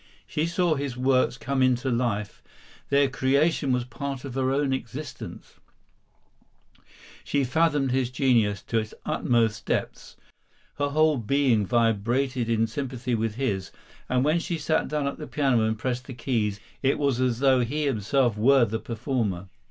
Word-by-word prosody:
She 155 +2 -1
saw 175 -1 +1
his 140 -4 -3
works 130 -1 +2
come 140 -1 -1
into 130 0 +2
life; 110 -4 -2 0.5
their 140 0 +4
creation 140 +2 +1
was 125 -1 +1
part 130 +3 -6
of 135 - -6
her 130 0 0
own 140 0 +1
existence; 130 +2 -7 1.6
she 140 -1 0
fathomed 145 -1 +1
his 130 -1 +1
genius 120 -6 +2
to 115 - 0
its 110 -1 -6
utmost 115 -3 0
depths; - - -3 0.6
her 145 0 +1
whole 155 0 +3
being 120 -3 +2
vibrated 120 +3 +1
in 115 -1 +2
sympathy 125 +1 -4
with 110 -1 -1
his, 105 -8 -2 0.4
and 130 +1 +2
when 155 +3 +3
she 170 0 -3
sat 155 0 0
down 150 -1 -1
at 140 - -3
the 150 - -6
piano 135 -6 +2
and 110 0 -1
pressed 125 +2 -3
the 130 - -7
keys, 105 -6 -1 0.2
it 135 0 +2
was 140 -4 0
as 125 -2 +1
though 135 0 +4
he 145 +6 -1
himself 125 -1 +1
were 125 +4 +5
the 110 0 -3
performer. 110 -6 -3
130 Hz, 160 wpm, -26 LUFS, 115-140 Hz, 1.6 s, were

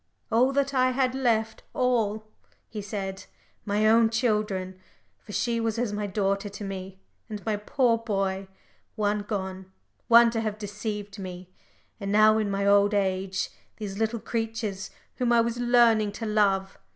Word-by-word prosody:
"All 245 +4 +4
that 280 0 +1
I 255 -1 +3
had 255 -1 +1
left 225 -4 0
all," 220 -4 +1 0.4
he 215 - -6
said. 195 -1 -5 0.4
"My 210 +1 +1
own 225 +1 +5
children, 210 -5 -1 0.4
for 210 - -12
she 235 +2 0
was 225 -1 -1
as 235 -3 -1
my 205 0 -2
daughter 200 0 -1
to 205 +1 -8
me, 190 -1 -6 0.3
and 210 -2 -7
my 220 -2 +1
poor 230 +3 +1
boy 195 -3 -2 0.5
one 210 -1 0
gone, 190 -2 -5 0.4
one 235 0 +7
to 225 -1 -1
have 215 -2 -3
deceived 210 0 -5
me. 185 -1 -8 0.5
And 200 -1 -3
now, 215 +1 +5
in 210 -2 -1
my 200 0 -1
old 200 +1 +4
age, 190 -1 -1 0.3
these 205 -2 -6
little 225 +1 0
creatures 225 -4 -3 0.3
whom 245 -2 +1
I 235 -1 +5
was 235 +1 -2
learning 235 -4 +4
to 225 +2 -5
love! 200 -3 +1
210 Hz, 160 wpm, -26 LUFS, 195-230 Hz, 0.5 s, one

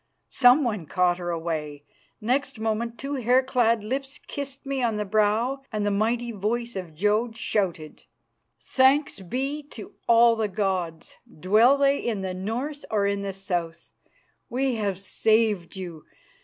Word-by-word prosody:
Someone 245 - +4
caught 180 +1 +1
her 175 -1 -4
away; 155 -4 -3 0.4
next 255 +2 -1
moment 225 +1 -2
two 275 +1 -4
hair 250 +1 +3
clad 235 -4 +2
lips 270 +5 -4
kissed 280 0 -6
me 270 -1 -2
on 230 -3 +1
the 210 0 -2
brow 215 +6 +1
and 210 -2 -1
the 205 - +1
mighty 230 +4 0
voice 235 +3 -2
of 180 -5 -6
Jodd 215 +6 +1
shouted, 190 -9 -2 0.5
"Thanks 270 +1 +2
be 265 - -3
to 280 -7 -11
all 235 0 +6
the 220 -1 0
gods, 185 -5 -3 0.2
dwell 220 - +5
they 280 0 +3
in 220 -5 -2
the 190 -1 -3
north 240 +10 -4
or 205 -2 +1
in 200 0 0
the 200 0 -3
south! 175 -4 -4 0.6
We 260 +1 0
have 205 -5 -1
saved 210 -1 +1
you! 175 -5 -8
220 Hz, 150 wpm, -25 LUFS, 190-250 Hz, 0.6 s, all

